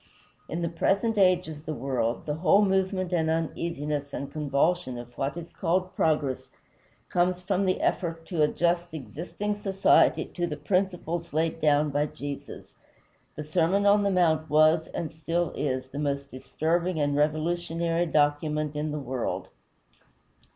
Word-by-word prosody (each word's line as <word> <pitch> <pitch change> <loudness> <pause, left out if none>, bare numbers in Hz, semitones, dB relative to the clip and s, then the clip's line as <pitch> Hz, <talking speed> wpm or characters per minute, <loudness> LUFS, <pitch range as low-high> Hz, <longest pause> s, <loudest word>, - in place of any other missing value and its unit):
In 170 +1 -3
the - - +1
present 200 +6 +1
age 185 -2 +4
of 155 -1 -9
the 155 - -2
world, 120 -3 -1
the 150 - -1
whole 190 +6 +4
movement 190 -1 0
and 160 -2 +1
uneasiness 150 -3 -2
and 140 - -5
convulsion 145 -1 0
of 120 0 -10
what 140 +4 -2
is 170 -1 -8
called 180 +1 -1
progress 150 -5 0 0.6
comes 180 +1 +1
from 195 +1 0
the 185 - +1
effort 165 -2 -1
to 170 -4 -2
adjust 170 +2 +1
existing 195 +8 -5
society 195 -1 +3
to 175 -1 -3
the 150 -3 -4
principles 175 0 -1
laid 160 +1 0
down 150 0 +3
by 145 +1 +1
Jesus. 145 -1 -8 0.6
The 150 - -5
Sermon 175 +6 +1
on 205 +1 +5
the 200 - +2
Mount 160 -4 +2
was, 155 +2 +4
and 160 -1 -5
still 165 +1 -1
is, 130 -2 -2
the 140 - -6
most 140 -1 -2
disturbing 165 +6 -1
and 145 -1 +1
revolutionary 165 +3 0
document 150 0 +1
in 150 +1 -2
the 150 - -3
world. 130 -3 -3
160 Hz, 150 wpm, -27 LUFS, 150-175 Hz, 0.6 s, on